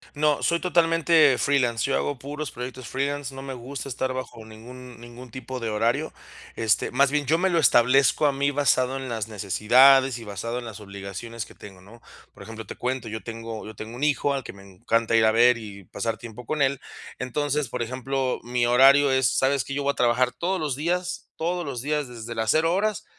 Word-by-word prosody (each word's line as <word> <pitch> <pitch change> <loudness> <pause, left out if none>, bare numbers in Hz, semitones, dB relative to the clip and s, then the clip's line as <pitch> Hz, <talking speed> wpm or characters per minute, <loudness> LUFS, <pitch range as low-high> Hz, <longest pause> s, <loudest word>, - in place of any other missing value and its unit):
No, 150 0 +1
soy 170 0 +1
totalmente 165 -5 +3
freelance, 125 -6 +1
yo 135 - 0
hago 145 - -1
puros 145 +3 -6
proyectos 125 0 -7
freelance, 140 0 -3
no 135 - -8
me 135 -1 -6
gusta 130 +1 -7
estar 130 0 -2
bajo 130 -3 -6
ningún 120 +3 -12
ningún 120 +1 -12
tipo 130 +1 -7
de 115 -2 -3
horario, 115 +8 0 0.4
este, 110 -3 +1
más 140 0 +2
bien, 145 -1 0
yo 160 +4 +3
me 190 +2 +1
lo 170 - +2
establezco 130 +2 +4
a 145 - +4
mí, 140 +1 0
basado 135 -2 +1
en 135 -1 -6
las 110 -3 -3
necesidades 125 +6 +4
y 115 - -9
basado 110 +3 -5
en 125 - -6
las 110 -3 -8
obligaciones 100 +3 -7
que - - -16
tengo, 95 -3 -13
¿no? 110 +5 -16 0.3
Por - - -16
ejemplo, 110 -1 -9
te - - -8
cuento, 125 -1 -3
yo 110 0 -5
tengo 115 -1 -7
yo 110 - -10
tengo 110 +3 -8
un 130 - -6
hijo 145 -1 +1
al 135 -1 -3
que - - -9
me 100 0 -15
encanta 110 +4 -1
ir 110 -1 +5
a 110 - +5
ver 120 +2 +5
y 100 -3 -10
pasar 115 +5 -3
tiempo 115 +1 -10
con 155 +5 -2
él. 135 0 0 0.4
Entonces, 145 +1 -2
por 125 -1 -3
ejemplo, 130 +2 -2
mi 120 0 0
horario 135 +3 +6
es, 130 -1 +2
¿sabes 135 -1 +2
que?, 140 - -7
yo 145 - -2
voy 140 - +2
a - - -8
trabajar 125 +1 +2
todos 175 +9 -2
los 150 -4 -2
días, 175 +5 -3
todos 175 +2 -2
los 130 -4 -4
días, 150 -1 -1
desde 115 -1 -8
las 110 0 -1
0 165 +2 +2
horas 210 +2 -1
130 Hz, 215 wpm, -25 LUFS, 115-140 Hz, 0.4 s, horario